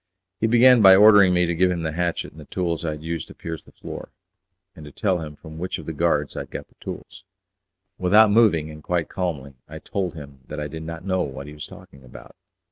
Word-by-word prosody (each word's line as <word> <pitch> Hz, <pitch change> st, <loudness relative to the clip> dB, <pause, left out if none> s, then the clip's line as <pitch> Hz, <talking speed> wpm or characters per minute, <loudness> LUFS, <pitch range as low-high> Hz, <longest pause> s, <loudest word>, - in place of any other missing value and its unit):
He 110 Hz, -, +1 dB
began 120 Hz, +1 st, +6 dB
by 95 Hz, -2 st, +9 dB
ordering 100 Hz, -2 st, +7 dB
me 90 Hz, 0 st, +3 dB
to 85 Hz, -, -1 dB
give 90 Hz, +2 st, +2 dB
him 85 Hz, -2 st, -2 dB
the 80 Hz, -, -2 dB
hatchet 85 Hz, +1 st, -2 dB
and 80 Hz, -, -13 dB
the -, -, -12 dB
tools 85 Hz, -1 st, -3 dB
I 85 Hz, -, -1 dB
had 75 Hz, 0 st, -10 dB
used 80 Hz, 0 st, -4 dB
to -, -, -13 dB
pierce 80 Hz, -2 st, -7 dB
the -, -, -18 dB
floor, -, -, -9 dB, 0.7 s
and 80 Hz, -, -12 dB
to 75 Hz, -, -11 dB
tell 95 Hz, +3 st, 0 dB
him 75 Hz, -2 st, -7 dB
from 80 Hz, +1 st, -11 dB
which 90 Hz, +2 st, -3 dB
of 80 Hz, -, -10 dB
the 80 Hz, -, -5 dB
guards 75 Hz, -2 st, 0 dB
I -, -, -3 dB
had -, -, -7 dB
got -, -, -7 dB
the -, -, -30 dB
tools. 95 Hz, 0 st, -9 dB, 0.8 s
Without 105 Hz, +4 st, +5 dB
moving, 95 Hz, -9 st, +3 dB
and 75 Hz, 0 st, -11 dB
quite 85 Hz, 0 st, -2 dB
calmly, 75 Hz, -7 st, -4 dB, 0.2 s
I -, -, -8 dB
told 95 Hz, -5 st, -4 dB
him 70 Hz, -3 st, -11 dB
that 75 Hz, -, -6 dB
I 75 Hz, -, -3 dB
did 80 Hz, +2 st, -8 dB
not 80 Hz, +2 st, -7 dB
know 95 Hz, -1 st, 0 dB
what 70 Hz, -3 st, -5 dB
he 75 Hz, -, -10 dB
was 75 Hz, -, -8 dB
talking 70 Hz, -1 st, -15 dB
about. 65 Hz, -, -14 dB
85 Hz, 245 wpm, -23 LUFS, 75-95 Hz, 0.8 s, by